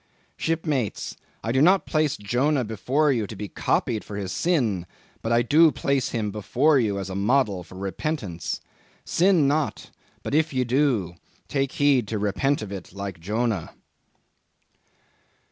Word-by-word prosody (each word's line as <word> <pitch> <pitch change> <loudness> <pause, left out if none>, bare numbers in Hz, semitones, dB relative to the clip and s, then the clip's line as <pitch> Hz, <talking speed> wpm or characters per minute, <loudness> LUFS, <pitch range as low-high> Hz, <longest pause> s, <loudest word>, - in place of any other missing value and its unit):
Shipmates, 155 -8 -2 0.3
I 115 - -1
do 130 +2 +2
not 185 +5 +5
place 155 -3 +1
Jonah 125 +7 +1
before 130 +7 +1
you 115 -6 0
to 110 - -8
be 105 +1 -5
copied 110 +3 0
for 105 - -8
his 95 -2 -4
sin 115 - 0 0.3
but 115 - -2
I 120 0 +4
do 155 +6 +5
place 140 -2 0
him 110 -3 -2
before 130 +8 +2
you 105 -5 0
as 95 -1 -4
a - - -4
model 105 -2 +2
for 90 - -14
repentance. 95 - -3 0.4
Sin 175 -5 +3
not; 150 +1 -1 0.3
but - - -4
if 155 0 +2
you 130 -1 +1
do, 120 - +1 0.3
take 135 -1 -1
heed 140 -6 +3
to 110 - -2
repent 105 +6 0
of 100 - -7
it 95 -3 -8
like 100 -2 -6
Jonah." 105 0 -2
120 Hz, 155 wpm, -25 LUFS, 100-145 Hz, 0.4 s, not